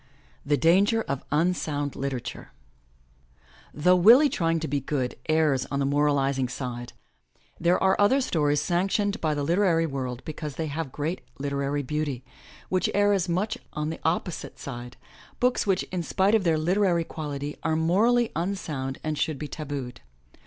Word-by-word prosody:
THE 145 0 +1
DANGER 200 +8 +4
OF 140 -1 -4
UNSOUND 150 -3 0
LITERATURE 130 -3 -5 1.3
HOUGH 180 +4 +5
Willie 240 - +7
Trying 165 -7 0
To 160 - -2
Be 145 +1 0
Good 130 -2 -2 0.2
errs 155 -4 +2
on 140 - -2
the 140 - +1
moralizing 140 -2 +1
side, 120 -2 -5 0.7
there 175 +2 +3
are 190 0 +4
other 215 +7 +5
stories 150 - +1
sanctioned 195 +4 0
by 155 -2 +1
the 145 - -2
literary 170 +1 +2
world 130 -4 -4
because 150 -2 -6
they 160 - -2
have 150 -1 -4
great 155 +7 -3 0.2
literary 140 +1 -2
beauty, 145 -2 -3 0.4
which 185 -1 +1
err 205 0 +4
as 190 -2 0
much 195 +6 -1
on 150 +1 -2
the 160 - -7
oppo 170 +2 0
site - - -8
side, 120 -2 -8 0.4
books 250 -3 +1
which, 190 -2 +2
in 180 -1 -1
spite 190 +5 +1
of 215 -4 +3
their 165 -2 +3
literary 175 +1 +2
quality, 145 -2 -5
are 160 0 0
morally 220 +9 +3
unsound 155 -7 -3
and 155 -1 -2
should 155 -3 0
be 150 - -5
ta 155 +1 -7
booed. 135 -4 -5
155 Hz, 165 wpm, -26 LUFS, 140-180 Hz, 1.3 s, Willie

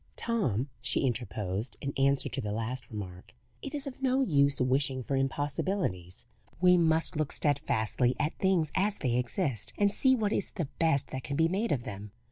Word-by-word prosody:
"Tom," 150 - 0
she 130 - 0
interposed, 110 -3 -2
in 140 -1 -4
answer 140 +1 +2
to - - -4
the 105 - -3
last 115 +4 -3
remark, 95 -5 -8 0.3
"it 280 +2 -5
is 285 -1 -4
of 270 -1 -8
no 260 0 +2
use 140 - +3
wishing 130 0 +1
for 135 - -2
impossibilities. 135 - -2 0.3
We 180 0 +6
must 165 0 +2
look 155 -2 -1
steadfastly 130 -4 +1
at 150 +2 0
things 180 -6 +2
as 200 +2 +1
they 125 -4 0
exist, 125 - -1
and 205 -1 +3
see 260 -1 +5
what 215 -3 0
is - - -1
the 170 - -1
best 160 -5 +2
that 130 - -4
can 140 -1 -3
be 160 - +4
made 200 +7 -1
of 125 -4 0
them. 105 -3 -8
140 Hz, 185 wpm, -30 LUFS, 120-180 Hz, 0.3 s, We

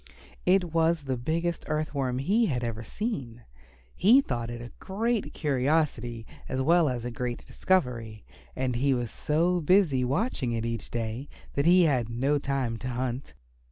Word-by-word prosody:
It 180 -3 +3
was 165 -1 +2
the 135 -2 -1
biggest 165 +7 -2
Earth 155 0 -1
Worm 130 -3 -1
he 205 - +2
had 125 -5 -1
ever 115 -1 -3
seen. 125 - -4 0.5
He 225 +9 +6
thought 120 - -2
it 120 0 -5
a 120 +1 -9
great 225 +3 -1
curiosity 135 -5 0 0.2
as 130 - -2
well 165 +3 +4
as 120 -2 -3
a 120 - -3
great 120 +1 -4
discovery, 120 - -1 0.3
and 130 -2 -1
he 135 +1 +2
was 120 -2 -3
so 170 +4 +1
busy 155 -6 +3
watching 135 - -1
it 115 0 -2
each 115 -1 -4
day 120 +4 -4 0.2
that 140 +3 +1
he 180 +1 +7
had 130 -8 +2
no 135 +5 +1
time 135 -5 -1
to 125 - -6
hunt. 125 - -3
135 Hz, 165 wpm, -28 LUFS, 120-165 Hz, 0.5 s, he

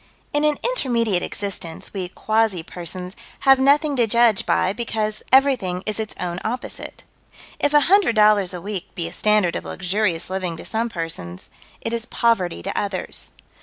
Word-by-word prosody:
In 295 0 +1
an 300 -1 +2
intermediate 235 - +1
existence, 185 -5 -5
we 190 -3 -3
quasi 215 -3 0
persons 180 +2 -6 0.3
have 270 -1 +6
nothing 285 +2 +3
to 235 -2 +3
judge 235 -2 +3
by 185 - +2
because 215 -1 -2
everything 250 -10 +3
is 215 0 -1
its 220 -1 -4
own 175 -1 -3
opposite. 245 +3 -5 0.6
If 290 - +2
a 295 - +7
hundred 375 - +4
dollars 210 -3 +5
a 180 - -5
week 195 -1 -6
be 170 -3 -2
a 170 - -8
standard 210 -3 +2
of - - -3
luxurious 185 -2 -1
living 185 -3 -3
to - - -9
some 230 +1 -1
persons, 165 - -6 0.3
it 230 - -3
is 235 0 -2
poverty 200 -7 +1
to 195 - -4
others. 200 -2 -2
210 Hz, 165 wpm, -22 LUFS, 180-235 Hz, 0.6 s, a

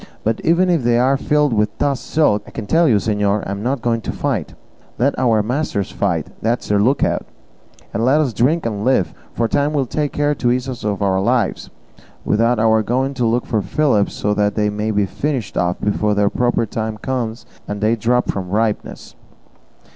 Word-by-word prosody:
But 110 +1 -1
even 170 +3 +3
if 165 -4 +2
they 120 0 +3
are 130 +3 +3
filled 150 0 +1
with 105 -1 0
toss 140 -2 0
silk, 150 -10 +1
I - - -9
can 110 - -6
tell 165 +7 +3
you, 120 - +4
señor, 105 0 0
I - - -4
am 100 0 -4
not 125 +2 -2
going 115 -1 0
to - - -4
fight; - - -3 0.4
let 140 +4 +2
our 115 -4 +3
masters 120 -4 -2
fight, 85 -6 -1 0.2
that's 115 +2 -1
their 105 -1 +3
lookout, 125 +7 +1 0.7
and 115 - -1
let 135 +5 +4
us 140 -6 0
drink 150 +10 +1
and 105 -3 -2
live; 125 -6 +2 0.2
for 115 - +1
time 145 +4 0
will 140 -3 +1
take 145 +3 -2
care 145 0 +1
to 120 -4 0
ease 125 +1 -1
us 125 -3 -6
of 105 -1 -1
our 95 -1 +1
lives, 120 +3 0 0.6
without 115 +3 +2
our 110 0 +3
going 130 +5 -1
to 125 -3 0
look 120 +2 0
for 110 - 0
fillips 105 - +1
so 105 - 0
that 105 0 +1
they 105 -1 +1
may 105 +1 -2
be 105 -2 +1
finished 130 +2 -3
off 90 0 0
before 105 0 0
their 100 0 +2
proper 120 -1 +1
time 110 0 -4
comes 120 -1 -3 0.2
and 105 0 -4
they 110 +2 +2
drop 120 +3 +1
from 95 -2 -3
ripeness." 105 +2 -2
115 Hz, 205 wpm, -19 LUFS, 105-130 Hz, 0.7 s, you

